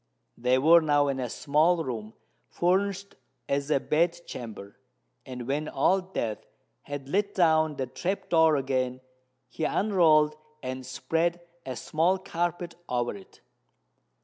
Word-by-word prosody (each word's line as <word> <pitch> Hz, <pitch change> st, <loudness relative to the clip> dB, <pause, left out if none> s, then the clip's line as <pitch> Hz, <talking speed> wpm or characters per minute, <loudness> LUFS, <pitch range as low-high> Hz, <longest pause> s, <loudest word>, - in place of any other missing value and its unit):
They 125 Hz, +2 st, +2 dB
were 165 Hz, +5 st, +6 dB
now 145 Hz, -2 st, +2 dB
in 135 Hz, -1 st, -2 dB
a 125 Hz, -2 st, -3 dB
small 160 Hz, +7 st, +2 dB
room 110 Hz, -5 st, -6 dB, 0.3 s
furnished 195 Hz, +2 st, 0 dB, 0.3 s
as 140 Hz, +1 st, -1 dB
a 150 Hz, -, +3 dB
bed 170 Hz, +4 st, +1 dB
chamber; 105 Hz, -4 st, -9 dB, 0.5 s
and 125 Hz, -2 st, -6 dB
when 150 Hz, +3 st, -1 dB
Old 190 Hz, 0 st, +1 dB
Death 110 Hz, -2 st, -2 dB, 0.4 s
had 145 Hz, -1 st, -7 dB
let 200 Hz, +6 st, 0 dB
down 160 Hz, -3 st, +3 dB
the 135 Hz, -, -2 dB
trap 185 Hz, +10 st, -3 dB
door 160 Hz, -2 st, +5 dB
again, 130 Hz, -2 st, -1 dB, 0.5 s
he 125 Hz, +6 st, -6 dB
unrolled 155 Hz, -6 st, +3 dB, 0.3 s
and 130 Hz, 0 st, -4 dB
spread 165 Hz, +6 st, -1 dB, 0.3 s
a 130 Hz, -, -4 dB
small 165 Hz, +9 st, +1 dB
carpet 175 Hz, -1 st, -3 dB, 0.2 s
over 120 Hz, -3 st, -1 dB
it. 95 Hz, -1 st, -15 dB
150 Hz, 135 wpm, -27 LUFS, 130-175 Hz, 0.5 s, were